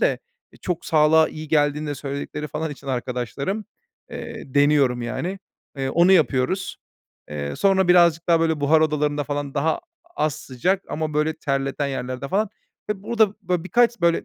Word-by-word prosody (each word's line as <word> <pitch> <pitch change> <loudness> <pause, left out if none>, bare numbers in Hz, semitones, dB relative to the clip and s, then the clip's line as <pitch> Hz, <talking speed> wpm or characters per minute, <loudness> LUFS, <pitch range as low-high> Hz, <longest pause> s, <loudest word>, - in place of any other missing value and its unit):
de, - - +2 0.3
e, - - -17
çok 175 -2 -4
sağlığa 155 0 +4
iyi 155 -1 -8
geldiğini 150 -1 +1
de 145 - -2
söyledikleri 140 +2 -5
falan 150 +2 -3
için 140 - -11
arkadaşlarım, 130 - -3 0.5
eee, 225 - -8
deniyorum, 140 -4 +3
yani. 170 +11 -3 0.4
Eee, 135 -1 -2
onu 175 +3 +5
yapıyoruz. 165 +3 +1 0.5
Eee, 70 -1 -4
sonra 190 -2 +3
birazcık 170 -2 +4
daha, 165 -1 +4
böyle, 160 -2 +1
buhar 155 +2 +4
odalarında 150 -1 +1
falan 145 -1 -4
daha 155 - 0 0.4
az 155 -1 +1
sıcak 155 +7 -1
ama, 155 -1 -3
böyle, 150 +1 +1
terleten 140 -1 -2
yerlerde 130 0 -4
falan 205 +4 +1 0.4
ve 195 -2 -3
burada, 220 -2 +2
böyle, 180 -2 -1
birkaç, 235 +4 +2
böyle, 170 -1 +2
155 Hz, 160 wpm, -23 LUFS, 140-180 Hz, 0.5 s, onu